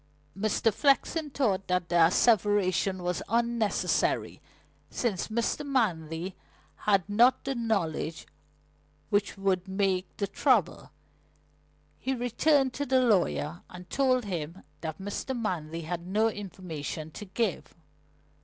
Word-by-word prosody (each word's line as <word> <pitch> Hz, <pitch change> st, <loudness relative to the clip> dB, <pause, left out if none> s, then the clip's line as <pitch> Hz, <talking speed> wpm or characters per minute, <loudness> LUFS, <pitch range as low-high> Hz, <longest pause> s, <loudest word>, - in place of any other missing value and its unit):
Mr. 215 Hz, +2 st, +1 dB
Flexen 295 Hz, +2 st, +2 dB
thought 215 Hz, -9 st, 0 dB
that 180 Hz, -1 st, 0 dB
the 175 Hz, -, -1 dB
asseveration 190 Hz, +1 st, +3 dB
was 175 Hz, -1 st, -1 dB
unnecessary, 235 Hz, -1 st, 0 dB, 0.5 s
since 215 Hz, -8 st, -1 dB
Mr. 235 Hz, +6 st, -1 dB
Manley 180 Hz, -, -1 dB, 0.5 s
had 195 Hz, -3 st, +3 dB
not 235 Hz, +5 st, +4 dB
the 270 Hz, -, -2 dB
knowledge 195 Hz, -, -2 dB, 0.9 s
which 205 Hz, -1 st, +1 dB
would 195 Hz, -1 st, 0 dB
make 190 Hz, -1 st, 0 dB
the 200 Hz, -, 0 dB
trouble. -, -, +1 dB, 1.1 s
He 265 Hz, 0 st, -1 dB
returned 260 Hz, +3 st, +2 dB
to 285 Hz, -, -3 dB
the 260 Hz, 0 st, +4 dB
lawyer 85 Hz, -, +1 dB
and 180 Hz, 0 st, -11 dB
told 255 Hz, -3 st, +2 dB
him 175 Hz, -2 st, -5 dB, 0.2 s
that 160 Hz, -2 st, -5 dB
Mr. 205 Hz, +6 st, -4 dB
Manley 170 Hz, -6 st, -3 dB
had 170 Hz, +2 st, -5 dB
no 215 Hz, +4 st, +2 dB
information 170 Hz, -6 st, -6 dB
to 210 Hz, -, -8 dB
give. 225 Hz, +4 st, -2 dB
200 Hz, 115 wpm, -28 LUFS, 180-235 Hz, 1.1 s, not